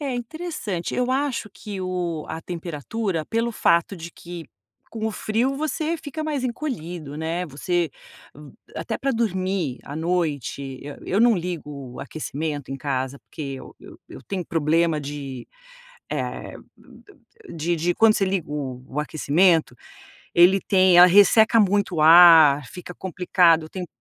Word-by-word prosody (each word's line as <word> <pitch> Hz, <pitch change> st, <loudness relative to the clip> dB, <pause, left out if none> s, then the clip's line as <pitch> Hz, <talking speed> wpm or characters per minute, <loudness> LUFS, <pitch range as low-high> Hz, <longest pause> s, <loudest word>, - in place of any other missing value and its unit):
É 275 Hz, -4 st, -3 dB
interessante 245 Hz, -, -5 dB
eu 250 Hz, 0 st, 0 dB
acho 265 Hz, -5 st, -1 dB
que 200 Hz, -3 st, -7 dB
o 175 Hz, -4 st, -3 dB
a 160 Hz, +1 st, -5 dB
temperatura 170 Hz, -, -4 dB
pelo 230 Hz, +1 st, -1 dB
fato 170 Hz, -1 st, +2 dB
de 170 Hz, +1 st, -8 dB
que 170 Hz, -1 st, -9 dB, 0.5 s
com 220 Hz, -1 st, -3 dB
o -, -, -1 dB
frio 240 Hz, +7 st, -1 dB
você 310 Hz, +2 st, -2 dB
fica 310 Hz, 0 st, -6 dB
mais 295 Hz, -4 st, -2 dB
encolhido, 175 Hz, -, -5 dB
né. 165 Hz, +3 st, -3 dB
Você 165 Hz, +3 st, -1 dB, 0.9 s
até 220 Hz, -, -4 dB
para 275 Hz, -, -1 dB
dormir 190 Hz, -, -1 dB
à 145 Hz, -, -7 dB
noite, 145 Hz, -6 st, -2 dB
eu 145 Hz, 0 st, -8 dB
eu 200 Hz, +4 st, +1 dB
não 235 Hz, -1 st, +5 dB
ligo 150 Hz, -7 st, -6 dB
o -, -, -8 dB
aquecimento 145 Hz, 0 st, -5 dB
em 135 Hz, -, -3 dB
casa 135 Hz, 0 st, -3 dB
porque, 140 Hz, -4 st, -7 dB
eu -, -, -12 dB, 0.3 s
eu -, -, -11 dB
tenho 185 Hz, -3 st, -4 dB
problema 165 Hz, 0 st, +1 dB
de 140 Hz, -3 st, -7 dB, 2.1 s
de, 170 Hz, +2 st, -1 dB
de 170 Hz, +2 st, 0 dB
quando 220 Hz, -1 st, +5 dB
você 195 Hz, -, +1 dB
liga 185 Hz, -5 st, -2 dB
o 130 Hz, -4 st, -5 dB
o 145 Hz, -, -3 dB
aquecimento, 155 Hz, -1 st, +2 dB, 0.6 s
ele 180 Hz, +3 st, +6 dB
tem 185 Hz, -2 st, +4 dB
ela 180 Hz, +1 st, +10 dB
resseca 215 Hz, +4 st, +6 dB
muito 200 Hz, -2 st, +2 dB
o 155 Hz, -, +1 dB
ar, 160 Hz, -4 st, +8 dB
fica 180 Hz, 0 st, -10 dB
complicado, 175 Hz, -3 st, +2 dB
eu -, -, -12 dB
tenho 180 Hz, -2 st, -6 dB
175 Hz, 145 wpm, -23 LUFS, 150-205 Hz, 2.1 s, ela